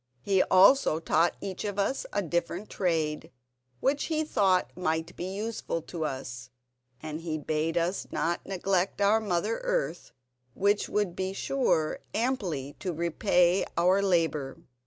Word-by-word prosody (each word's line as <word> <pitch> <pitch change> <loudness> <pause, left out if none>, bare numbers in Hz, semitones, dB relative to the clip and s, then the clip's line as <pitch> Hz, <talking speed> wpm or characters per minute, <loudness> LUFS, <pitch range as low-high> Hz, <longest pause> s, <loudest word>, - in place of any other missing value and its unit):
He 195 -2 +3
also 190 - +5
taught 165 +1 +2
each 190 -2 -5
of 205 -1 -3
us 205 +7 0
a 205 - 0
different 175 +4 -2
trade 160 -5 -1 0.5
which 275 +2 +1
he 315 -1 0
thought 195 -10 +1
might 160 -1 -2
be 175 - -5
useful 195 -3 -3
to 165 -2 -4
us, 125 -3 -5 0.5
and 155 +1 -5
he 160 -2 -3
bade 155 +2 -1
us 170 +3 -1
not 170 +1 -1
neglect 190 0 -1
our 205 +2 +4
mother 210 +1 -1
earth, - - -2 0.4
which 205 +1 +1
would 205 -4 0
be 190 0 -2
sure 195 - 0 0.2
amply 190 - -1
to 185 - -2
repay 175 +2 +2
our 180 +3 +4
labour." 165 -7 0
180 Hz, 140 wpm, -28 LUFS, 165-205 Hz, 0.5 s, also